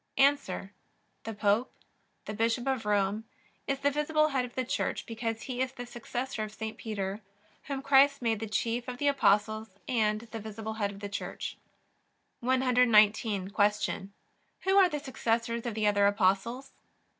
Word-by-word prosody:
A. 275 +1 +7 0.9
The 225 -1 -5
Pope, 210 +4 +2 0.5
the 215 - -5
Bishop 230 +3 0
of 260 -5 -1
Rome, 205 +1 +1 0.4
is 275 0 -1
the 285 - +3
visible 305 +1 +2
Head 265 -3 0
of 245 - -12
the 255 - -1
Church - - -2
because 225 0 -4
he 255 -1 -3
is 260 0 -1
the 245 -2 -7
successor 240 0 -4
of 215 - -6
St. 220 0 -5
Peter, 205 -2 -4 0.4
whom 275 -1 -4
Christ 280 0 +5
made 225 -3 0
the 225 - -4
chief 235 +2 -1
of 250 -1 -5
the 290 - 0
Apostles 215 -4 +2 0.2
and 215 -3 +1
the 225 -1 -8
visible 220 +1 -6
Head 200 - +2
of 200 0 -10
the 205 - -3
Church. 200 +1 -5 0.8
119. 230 -6 +3
Q. 205 -1 +1 0.5
Who 380 +1 +2
are 385 -2 +7
the 295 - -3
successors 235 -3 -1
of 230 - -3
the 215 -1 0
other 205 -1 +4
Apostles? 205 +6 +1
230 Hz, 165 wpm, -30 LUFS, 210-260 Hz, 0.9 s, A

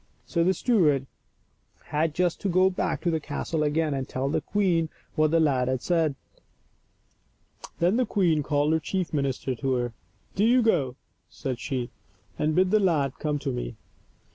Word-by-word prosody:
*' - - -39
So 170 -2 0
the 185 +2 +2
steward 160 - +2 0.8
had 155 +1 0
just 180 -1 0
to 200 - -1
go 185 +1 +4
back 180 - -2
to 170 - +1
the 160 - 0
castle 155 +2 -3
again 150 0 +1
and 135 -1 -3
tell 135 +1 -2
the - - 0
queen 180 -5 +1 0.2
what 155 -1 +3
the 165 +2 +3
lad 135 -5 +2
had 130 -1 -1
said. 165 -5 +1 1.6
Then 180 +6 +2
the 250 -2 +1
queen 170 -8 +2
called 145 +1 +1
her 160 - +2
chief 180 +3 -3
minister 135 -2 -1
to 130 +2 -1
her. 120 -1 -2 0.2
" - - -37
Do 200 - +2
you 245 +2 +5
go,'* 145 - +1 0.3
said 130 -3 -5
she, 125 -4 -3 0.2
" 100 +2 -33
and 155 0 +1
bid 185 0 +3
the 215 - +5
lad 155 -9 +1
come 150 -1 -1
to 135 - 0
me." - - -4
155 Hz, 190 wpm, -26 LUFS, 135-180 Hz, 1.6 s, you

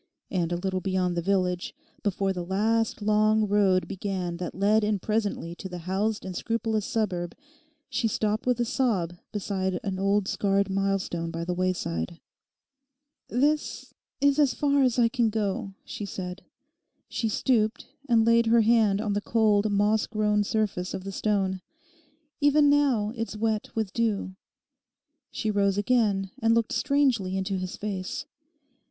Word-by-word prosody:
And 175 -3 0
a 175 - 0
little 185 +1 -2
beyond 185 -2 0
the 170 - 0
village, 180 - 0 0.3
before 195 -1 0
the 180 -1 -4
last, 215 +4 0
long 215 0 +3
road 195 -2 +3
began 185 -3 -3
that 175 -1 -5
led 210 +3 +3
in 210 0 +1
presently 205 -4 -2
to 190 +2 -8
the 180 - -6
housed 195 +5 -2
and 185 -1 -5
scrupulous 225 0 -1
suburb, 180 -6 -2 0.5
she 230 - 0
stopped 215 +1 -1
with 250 -1 +2
a 240 - +2
sob 215 -9 0 0.2
beside 190 -3 -2
an 195 -3 -3
old 200 0 +1
scarred 200 -1 +1
milestone 195 -4 -1
by 165 0 -4
the 180 - -1
wayside. 170 - -2 1.1
'This—is 285 +1 0
as 285 -3 +3
far 285 -1 +2
as 255 -2 +2
I 235 -1 +5
can 235 -1 +1
go,' 200 -2 -2
she 205 - -6
said. 180 0 -6 0.7
She 225 - -2
stooped, 220 -1 +1 0.2
and 225 -2 +4
laid 230 0 +4
her 230 +1 +5
hand 215 -3 +3
on 210 -2 -1
the 205 - 0
cold 215 -2 +2
moss 205 +2 +2
grown 210 -1 +1
surface 205 -4 -1
of 185 - -6
the 195 - -5
stone. 195 -2 0 0.8
'Even 290 0 +5
now 260 -8 +2
it's 225 -2 -4
wet 215 -1 -1
with 220 -4 -2
dew.' 215 -5 -1 0.9
She 220 - -2
rose 200 -1 +2
again 205 -4 +1
and 225 0 +4
looked 230 -1 +1
strangely 260 -10 +1
into 190 0 -2
his 185 0 -5
face. 200 +5 -4
205 Hz, 155 wpm, -27 LUFS, 190-225 Hz, 1.1 s, I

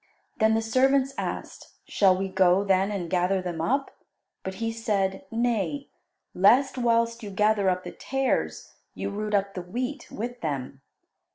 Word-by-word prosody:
Then 220 0 +4
the 225 - 0
servants 265 +4 +2
asked, - - -6
"Shall 190 -2 +3
we 195 +1 -1
go, 190 0 +3
then, 195 0 +2
and 195 -4 -3
gather 180 +2 +1
them 175 -3 -4
up?" 275 +11 0 0.5
But 190 0 -5
he 225 +2 -2
said, 200 -5 -1
"Nay, 240 +4 -1 0.4
lest 245 +9 +4
whilst 230 -1 +1
you 210 - -6
gather 210 0 +2
up 185 0 -1
the - - -7
tares, 270 0 -2 0.2
you - - -3
root 210 +1 -2
up 195 0 0
the 180 - -4
wheat 250 +9 -4
with 245 +2 -6
them. 135 -3 -4
210 Hz, 160 wpm, -26 LUFS, 190-240 Hz, 0.5 s, Then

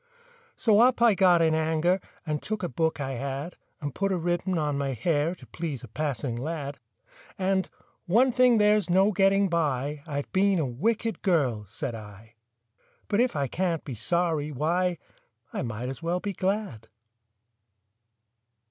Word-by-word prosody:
So 215 -4 +4
up 245 +1 +5
I 235 -2 +6
got 180 -3 +4
in 160 -1 +3
anger, 160 +3 +1 0.3
And 150 -2 -2
took 215 -2 -4
a 175 - -1
book 160 +4 0
I 135 -1 -3
had, 140 +6 -4 0.2
And 145 -3 -4
put 195 0 -1
a 185 - +1
ribbon 175 +2 -1
on 150 -2 0
my 140 -1 -1
hair 150 - 0
To - - -15
please 155 -7 -5
a - - -8
passing 130 0 -3
lad. 145 +2 -4 0.6
And, 190 0 0 0.4
"One 240 +9 +4
thing 250 -1 +5
there's 210 -3 +3
no 190 +4 +4
getting 195 0 +3
by— 150 -4 -1
I've 145 -2 -4
been 195 0 +3
a 160 - +1
wicked 220 - -1
girl," 135 - +1
said 110 +3 -5
I; 110 0 -11 0.8
"But 205 - +1
if 250 0 +1
I 140 -2 +1
can't 170 +2 -1
be 135 - -5
sorry, 155 +5 0
why, 170 +5 0 0.6
I - - -2
might 115 +1 -4
as 130 -1 -6
well 170 +2 -1
be 200 +1 -4
glad!" 190 - -2
165 Hz, 165 wpm, -27 LUFS, 140-190 Hz, 0.8 s, I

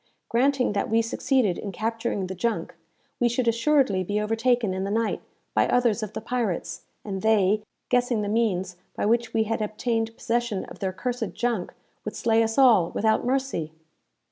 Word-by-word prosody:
Granting 255 -1 +2
that 200 - -1
we 225 +1 +3
succeeded 230 -4 +1
in 200 - -5
capturing 225 -1 -2
the 185 - -5
junk, 190 -3 -2 0.5
we 240 - +3
should 240 +1 -1
assuredly 230 -4 +3
be 205 +3 -1
overtaken, 225 0 +1
in 190 0 -2
the 195 - -2
night, 225 +2 0 0.3
by - - +3
others 235 -3 +2
of 215 -1 -5
the - - -4
pirates, 230 -6 -2 0.2
and 195 -2 -4
they, 210 -1 +3 0.3
guessing 245 -3 +2
the - - -2
means 190 -5 0 0.2
by - - -1
which 235 +2 +1
we 220 - +2
had 225 0 -2
obtained 225 +1 -2
possession 235 -4 -1
of - - -12
their 190 -1 -1
cursed 240 +3 -3
junk, 235 -7 -1 0.3
would 215 - -5
slay 225 0 +2
us 225 0 0
all, 235 -11 +6
without 220 +1 +1
mercy." 260 - -1
225 Hz, 175 wpm, -25 LUFS, 205-240 Hz, 0.5 s, all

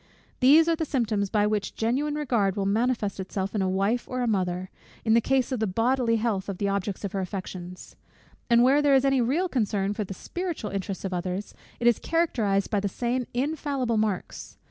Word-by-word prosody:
These 300 +6 +6
are 335 - +3
the 320 - -2
symptoms 225 -9 0
by 210 0 +2
which 210 -1 -1
genuine 270 +7 0
regard 235 -10 +1
will 200 -2 -1
manifest 215 -1 0
itself 190 +1 -3
in 210 - 0
a 190 - +1
wife 200 +6 0
or 255 -1 -2
a - - 0
mother, 185 -3 -1 0.3
in 220 - +4
the 230 - +5
case 265 +1 +1
of 255 - -1
the 220 - +1
bodily 230 +4 +1
health 215 -4 -1
of 195 - -4
the 200 - -1
object 200 0 -2
of 195 - -3
her 195 - -2
affections. 185 -1 -6 0.5
And 235 0 +6
where 275 +4 +5
there 285 -2 +4
is 265 0 +3
any 270 -2 +3
real 295 +11 +1
concern 205 - 0
for 210 - -2
the 195 -1 -7
spiritual 345 - -4
interests 195 0 -4
of 190 - -3
others, 180 +3 -3 0.3
it 235 - -3
is 240 -2 +5
characterized 225 - 0
by 210 - +2
the 200 0 -1
same 245 +4 -2
infallible 275 -3 -1
marks. 210 -4 -3
220 Hz, 210 wpm, -26 LUFS, 195-255 Hz, 0.5 s, These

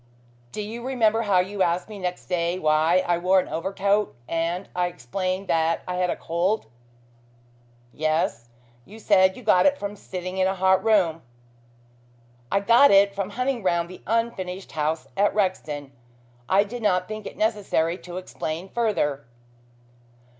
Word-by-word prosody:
Do 210 - -4
you 230 +3 -7
remember 230 -4 +2
how 200 -5 +3
you 195 +2 -4
asked 175 0 +1
me 210 -2 -9
next 180 -1 -4
day 175 -1 -1
why 160 +2 +3
I 175 -1 +1
wore 185 +2 +4
an - - -2
overcoat 200 +4 0
and 170 +3 -2
I 180 0 +1
explained 185 +6 -4
that 165 0 +1
I 180 - -2
had 180 0 +1
a - - 0
cold 175 +6 -1 0.7
" 120 0 -33 0.5
"Yes. 155 -7 -1 0.3
You 210 - -13
said 190 -3 +3
you 250 - -11
got 180 0 +5
it 285 0 +2
from 205 -3 -5
sitting 185 -1 -6
in 185 - +3
a 190 - -1
hot 190 0 +3
room." 185 -8 +2 1.3
"I 200 - +2
got 235 +7 +6
it 200 0 +5
from 195 -1 -3
hunting 250 +3 -2
round 170 -2 0
the 185 - -11
unfinished 195 -5 -2
house 155 +1 -2
at 205 +1 +2
Rexton. 155 -8 -2 0.6
I 195 +2 +5
did 235 +4 -7
not 185 -4 +1
think 215 -1 -6
it - - -10
necessary 200 -6 0
to 180 0 -8
explain 180 -1 -5
further." 150 - -1
185 Hz, 160 wpm, -24 LUFS, 170-205 Hz, 1.3 s, got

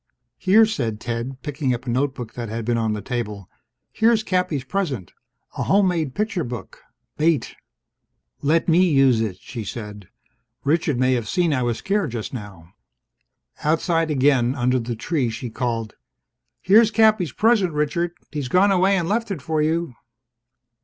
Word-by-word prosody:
"Here," 210 +4 +5
said 120 - -2
Ted, 120 +3 -5
picking 140 -4 -1
up 120 - -9
a - - -4
notebook 130 -2 -2
that 120 -2 -5
had 115 +1 -4
been 120 0 +1
on 110 -2 0
the 105 -2 -5
table. 105 -5 -4 0.4
"Here's 225 -1 +3
Cappy's 180 -9 -1
present. 135 - -3 0.5
A - - +1
homemade 180 -8 +2
picture 210 -5 -1
book. 120 -1 -8 0.4
Bait." 155 -4 +1 0.9
"Let 160 +4 +2
me 180 +2 +4
use 135 -6 +4
it!" 105 -5 -2
she 115 +4 -7
said. 105 -2 -8 0.5
"Richard 150 -2 +1
may 130 +1 +2
have 115 -4 -2
seen 175 -4 +1
I 130 - 0
was 120 -2 0
scared 195 - -1
just 115 0 -5
now." 95 -7 -9 0.9
Outside 165 +1 +1
again, 135 -3 +2
under 125 -1 +1
the 120 0 -4
tree, 135 +1 -1
she 115 +1 -6
called, 115 -3 -3 0.7
"Here's 215 +4 +6
Cappy's 215 - +3
present, 215 -5 +2
Richard. 165 +4 -1 0.2
He's 145 -3 -3
gone 185 +8 +4
away 195 +1 +3
and 170 -3 -1
left 225 +4 -1
it 195 -6 -3
for 155 0 0
you." 160 -1 0
140 Hz, 160 wpm, -22 LUFS, 120-180 Hz, 0.9 s, Here's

